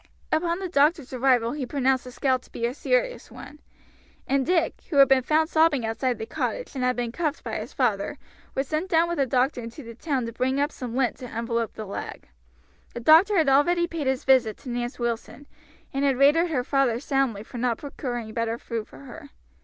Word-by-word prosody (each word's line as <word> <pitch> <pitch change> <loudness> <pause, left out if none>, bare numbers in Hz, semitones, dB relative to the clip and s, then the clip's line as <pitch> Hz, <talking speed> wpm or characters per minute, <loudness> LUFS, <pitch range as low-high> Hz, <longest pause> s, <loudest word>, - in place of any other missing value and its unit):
Upon 335 +2 +1
the 380 0 -4
doctor's 295 -3 +2
arrival 250 -2 +2
he 290 0 -4
pronounced 265 -1 +1
the 250 - -8
scald 260 0 0
to - - -22
be 235 - -3
a 240 - -1
serious - - -1
one, 300 - -12 0.7
and 275 0 +1
Dick, 340 +1 0
who 315 - -4
had 275 -1 +8
been 270 -1 +4
found 310 +4 +2
sobbing 315 -7 +3
outside 240 +2 -1
the 220 - -5
cottage, - - -3
and 260 -3 -3
had 250 0 +2
been 240 -1 -2
cuffed 310 +2 -2
by - - -3
his - - -7
father, 220 -7 0 0.4
was 270 0 -1
sent 315 +5 -2
down 330 0 +3
with 345 -3 -3
the 275 - +2
doctor 255 +1 +1
into 230 +5 -9
the 230 0 -9
town 260 0 -2
to 230 - -6
bring 260 +3 0
up 290 +2 +1
some 245 -2 -6
lint 260 -3 +1
to 250 - -8
envelop 230 -1 -2
the 215 - -6
leg. 195 - -7 0.7
The - - -3
doctor 330 - +6
had 320 -4 +3
already 345 +6 +4
paid 330 -5 -4
his 265 0 0
visit 250 -5 +3
to 260 - -8
Nance 240 +1 -3
Wilson, 235 +4 -4 0.5
and 275 +1 -1
had 275 -2 +2
rated 295 +6 +5
her 265 -6 0
father 260 -3 +1
soundly 270 -7 0
for 240 - -9
not 240 -1 0
procuring 240 -6 -5
better 230 0 -1
food 230 -2 -5
for - - -14
her. 285 +2 -11
265 Hz, 215 wpm, -25 LUFS, 240-305 Hz, 0.7 s, had